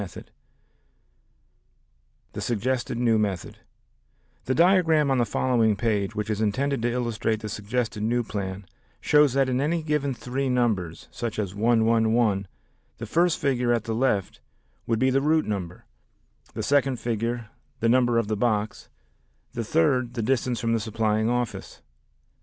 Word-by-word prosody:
The 100 - -4
Present 85 - -11
Method - - -32 2.0
The - - -5
Suggested 120 +1 -1
New 115 -2 +2
Method 100 -5 -3 0.9
The 130 - 0
diagram 165 -5 +4
on 130 - +2
the 120 - +1
following 115 -4 +2
page, 105 -1 -1
which 105 0 -2
is 105 0 -2
intended 130 +5 0
to 120 +1 0
illustrate 115 -3 -1
the 110 - -5
suggested 105 +1 -3
new 120 +3 +1
plan, 100 -2 -5 0.3
shows 150 -3 +4
that 135 -1 +2
in 130 0 0
any 160 +3 0
given 150 -3 -1
three 130 +3 -3
numbers, 110 -10 -1
such 115 -2 -4
as 100 -4 -2
111, 110 -2 +2 0.5
the - - -6
first 170 0 +2
figure 125 -3 0
at 115 -2 +1
the 115 - -3
left 110 -5 0 0.5
would 115 - +1
be 130 +3 +2
the 135 +1 +2
route 155 +2 +2
number, 90 -5 -5 0.7
the - - -3
second 140 -2 +2
figure 115 0 -3 0.3
the 115 - +1
number 120 0 +3
of 115 -2 +1
the 110 - -1
box, 110 -1 -1 0.6
the 120 - -3
third 130 -2 +1
the 115 - -2
distance 125 0 0
from 115 -1 0
the 115 - +1
supplying 110 0 0
office. 120 -2 -3
120 Hz, 160 wpm, -25 LUFS, 110-130 Hz, 2.0 s, diagram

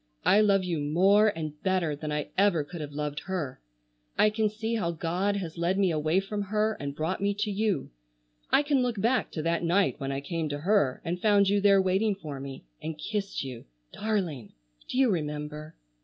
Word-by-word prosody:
I 205 +3 +6
love 200 -2 +4
you 175 -3 -1
more 190 +9 +4
and 155 -6 -3
better 185 -5 +1
than 150 +1 -5
I 150 -1 -2
ever 190 -6 +3
could 165 +3 -8
have 145 -1 -6
loved 150 0 -3
her. 160 -9 -3 0.6
I 215 - +5
can 215 0 +1
see 220 +2 -3
how 200 -7 0
God 175 +5 -1
has 170 -4 -5
led 175 +3 +1
me 195 -3 +3
away 155 +3 +2
from 205 +1 -3
her 215 +2 0
and 140 0 -4
brought 165 +5 -2
me 200 0 +1
to 210 +1 -1
you. 200 -8 -1 0.6
I 290 - +4
can 285 -2 +2
look 245 -4 -1
back 240 +5 +1
to 155 - -3
that 170 +1 0
night 180 +2 +2
when 135 -1 -3
I 135 - -2
came 160 +2 -3
to 145 0 -4
her 180 -8 +2
and 175 +2 -2
found 205 -2 +4
you 200 0 +2
there 200 -1 +6
waiting 190 +3 +2
for 150 -7 -7
me, 135 - -8 0.2
and 160 -1 -5
kissed 200 +2 -3
you,—darling. 130 - -4 0.4
Do - - -3
you 260 -4 +4
remember?" 150 -1 -4
180 Hz, 200 wpm, -28 LUFS, 150-205 Hz, 0.6 s, I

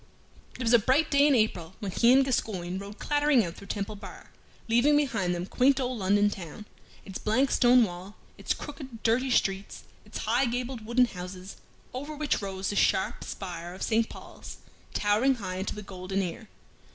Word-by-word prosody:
It 255 - -4
was 230 0 +2
a 235 - +8
bright 270 +8 +2
day 285 0 +5
in 285 - +4
April 190 -6 0
when 200 -3 -4
he 235 +5 +4
and 270 +1 +6
Gascoyne 190 -8 -2
rode 200 +2 -9
clattering 290 -6 +2
out 170 - -5
through 200 - -13
Temple 205 0 -4
Bar, 205 - -11 0.4
leaving 240 +6 +4
behind 200 -12 0
them 175 +1 -3
quaint 265 +7 +3
old 255 -2 -2
London 205 +2 +3
town, 190 +2 -8 0.4
its 195 -2 -7
blank 255 +6 +1
stone 245 0 +5
wall, 185 +1 -6 0.2
its - - -2
crooked, 265 -6 -9
dirty 245 +4 +2
streets, 195 -5 0 0.2
its 210 - -8
high 240 +5 +2
gabled 245 0 -3
wooden 250 +2 +4
houses, 185 -2 -8 0.4
over 285 +4 -5
which 295 -5 -1
rose 195 -1 -3
the - - -4
sharp 190 -1 +1
spire 175 -2 -6
of - - -6
St. 225 0 +1
Paul's, - - -11 0.4
towering 215 +6 +3
high 185 -5 -5
into 190 - -3
the 210 - -7
golden 190 0 -3
air. 190 +5 -6
215 Hz, 185 wpm, -28 LUFS, 190-255 Hz, 0.4 s, a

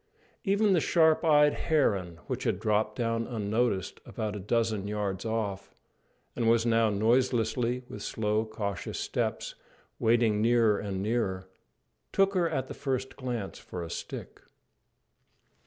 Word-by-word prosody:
Even 200 0 +3
the 175 - +4
sharp 160 -1 +4
eyed 150 -2 +5
heron, 100 - 0
which - - -3
had - - 0
dropped 105 0 +1
down 115 -1 -1
unnoticed 110 -3 -1
about 105 -1 -4
a - - -4
dozen 110 0 0
yards 100 -2 -3
off, 110 -3 -3 0.6
and 115 -2 +1
was 115 0 +3
now 115 -1 +3
noiselessly, 120 +2 +1
with 105 - -8
slow, 105 0 0
cautious 105 -3 -4
steps, - - -2 0.5
wading 115 -2 +3
nearer 115 -2 +4
and 95 -2 -3
nearer, 100 -4 -1 0.6
took 195 0 +3
her 175 -3 +2
at 130 0 -2
the - - -6
first 130 -2 -3
glance 120 -7 -4
for 90 - -7
a 85 - -7
stick. - - -7
115 Hz, 140 wpm, -29 LUFS, 105-125 Hz, 0.6 s, eyed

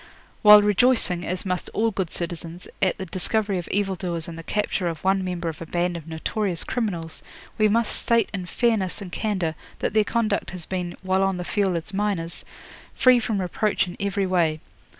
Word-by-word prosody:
'While 210 -1 +9
rejoicing, 210 -4 +3
as 185 +2 -3
must 180 -1 -2
all 225 +1 +2
good 190 -4 -2
citizens, 170 0 -5
at 190 -2 +2
the 190 - -5
discovery 195 +2 0
of 175 - -7
evil 200 -1 0
doers 170 -3 -4
and 170 - -7
the 165 - -7
capture 200 0 -1
of 165 -2 -4
one 190 0 +2
member 180 -2 -3
of 160 0 -5
a 165 - -6
band 175 +1 -1
of 165 -2 -7
notorious 175 +3 0
criminals, 175 -9 -3 0.4
we 215 - +5
must 230 +2 +2
state 230 -1 +2
in 185 -3 -4
fairness 215 -2 0
and 190 -4 -8
candour 185 -6 -1 0.2
that - - -2
their 215 -1 +4
conduct 215 -2 0
has 180 -3 -7
been, 180 -2 -4
while 190 0 +1
on 195 -1 +1
the 180 - -5
field 195 -3 0
as 170 +5 -5
miners, 190 -4 -2 0.5
free 255 -1 +6
from 220 -3 -1
reproach 195 +4 0
in 175 - -7
every 200 0 0
way. 170 -4 +1
190 Hz, 195 wpm, -24 LUFS, 175-210 Hz, 0.5 s, While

